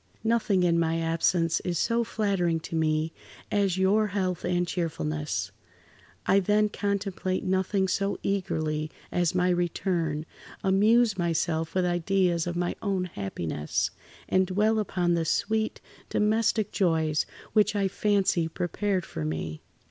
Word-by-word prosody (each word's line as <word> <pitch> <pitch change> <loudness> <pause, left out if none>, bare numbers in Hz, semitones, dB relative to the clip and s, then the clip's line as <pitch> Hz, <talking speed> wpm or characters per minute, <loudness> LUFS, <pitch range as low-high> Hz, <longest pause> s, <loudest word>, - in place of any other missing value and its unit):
"Nothing 220 -5 +2
in 170 -1 +3
my 165 0 +1
absence 165 +1 +1
is 175 -2 -2
so 235 +6 +1
flattering 195 -7 0
to 165 - -6
me 155 0 +1 0.4
as 200 -3 +1
your 205 +3 +3
health 185 -3 -2
and 175 0 0
cheerfulness. 75 - -2 0.7
I 195 - +5
then 210 +2 +2
[Pg 200 -1 0
64]contemplate 185 -1 -2
nothing 190 +1 +1
so 195 +2 0
eagerly 155 -6 -1 0.2
as 175 -1 +1
my 180 0 +3
return, 170 -3 0 0.4
amuse 210 +2 +4
myself 165 -1 0
with 185 -1 +2
ideas 175 -1 +1
of 175 - -2
my 175 0 -1
own 190 -4 -1
happiness, 85 -6 -2 0.4
and 185 0 +2
dwell 210 +4 +2
upon 180 -4 0
the 170 -1 +1
sweet 220 +6 0 0.3
domestic 215 0 +1
joys 160 -5 +1 0.3
which 210 -1 +3
I 200 -1 +2
fancy 195 -4 +1
prepared 180 +3 -1
for 80 - -5
me. 80 0 -4
180 Hz, 135 wpm, -27 LUFS, 165-200 Hz, 0.7 s, I